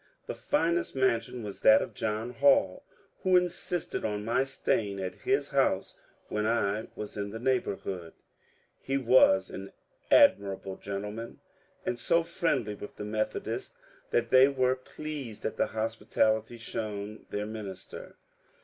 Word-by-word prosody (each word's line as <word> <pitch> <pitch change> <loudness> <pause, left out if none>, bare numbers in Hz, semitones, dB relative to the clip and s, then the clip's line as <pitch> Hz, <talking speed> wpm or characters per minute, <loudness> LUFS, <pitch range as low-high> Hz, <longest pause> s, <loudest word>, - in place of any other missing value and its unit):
The - - -4
finest 170 - 0
mansion 125 -2 0
was 100 -2 -7
that 110 0 +7
of - - -5
John 110 +2 -2
Hall, 125 -7 +3 0.4
who 185 -1 +5
insisted 175 -1 -2
on 105 -1 -2
my 115 +3 +2
staying 105 -7 -1
at 95 -1 -3 0.2
his 405 +1 +2
house - - +1 0.3
when 105 0 -1
I 110 -2 0
was 105 0 -6
in 100 0 -3
the 110 - -6
neighbourhood. 100 -8 -2 0.7
He 135 +1 -1
was 120 -7 +5
an 95 +1 -7 0.4
admirable 95 -1 +4
gen 100 0 -4
tleman 110 +3 -6 0.5
and 120 - -2
so 170 +7 +3
friendly 145 - -1
with 105 0 -9
the 105 - -6
Methodists 110 +1 -3 0.3
that 120 -1 0
they 130 +1 +8
were 130 -2 +2
pleased 135 -3 -7
at - - -2
the - - +2
hospitality 110 0 0
shown 105 -2 -5
their 105 0 -2
minister. 105 -3 -8
110 Hz, 140 wpm, -29 LUFS, 105-130 Hz, 0.7 s, they